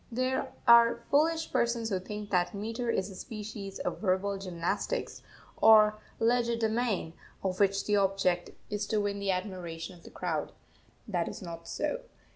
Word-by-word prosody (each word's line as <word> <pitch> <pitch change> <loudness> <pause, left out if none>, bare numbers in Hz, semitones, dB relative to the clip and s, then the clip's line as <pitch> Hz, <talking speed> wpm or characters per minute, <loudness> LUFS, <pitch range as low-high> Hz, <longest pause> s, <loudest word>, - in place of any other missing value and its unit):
There 255 +2 -1 0.2
are 235 0 +7
foolish 320 +3 +2
persons 235 -1 +1
who 190 - +1
think 210 +2 -7
that 180 +1 +1
metre 230 +4 -3
is 195 -3 0
a - - -10
species 210 -2 -7
of - - -3
verbal 195 0 +1
gymnastics, 190 - -2 0.4
or 215 -1 +7 0.2
legerdemain, 230 -5 +1 0.3
of 185 -1 -1
which 195 -1 +2
the 210 -1 +3
object 190 -3 +1 0.2
is 205 0 -2
to 215 - +1
win 200 -1 -1
the 200 0 -2
admiration 180 -2 -3
of 170 - -17
the - - -11
crowd. - - -3 0.5
That 175 -5 -1
is - - -7
not 165 -1 -8
so. - - -2
205 Hz, 155 wpm, -30 LUFS, 185-230 Hz, 0.5 s, are